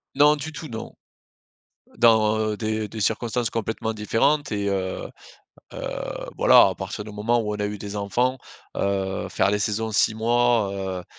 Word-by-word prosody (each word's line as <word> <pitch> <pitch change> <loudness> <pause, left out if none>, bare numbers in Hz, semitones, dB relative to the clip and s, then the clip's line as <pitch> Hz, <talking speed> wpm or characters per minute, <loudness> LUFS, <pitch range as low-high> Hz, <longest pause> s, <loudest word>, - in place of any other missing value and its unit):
Non 150 +2 +6
du 155 +2 -6
tout, 155 +1 -8
non 110 -2 -7 1.0
dans 110 -2 +3
des 110 -1 -2
des 110 - -7
circonstances 115 +2 0
complètement 110 0 -3
différentes 115 +6 +1
et 100 -1 -1
heu 95 -1 -2 0.7
heu, - - -5
voilà, - - +7
à - - -4
partir 105 - -6
du 105 - -9
moment 115 +3 +1
où 105 -2 -2
on 105 - -6
a - - 0
eu 105 0 -5
des 100 0 -7
enfants, 120 +6 0 0.4
heu, 95 -1 -1
faire - - +1
les 105 0 0
saisons 110 +1 -1
6 110 - +3
mois 115 -2 +2
heu, 95 -2 -4
110 Hz, 165 wpm, -24 LUFS, 105-120 Hz, 1.0 s, voilà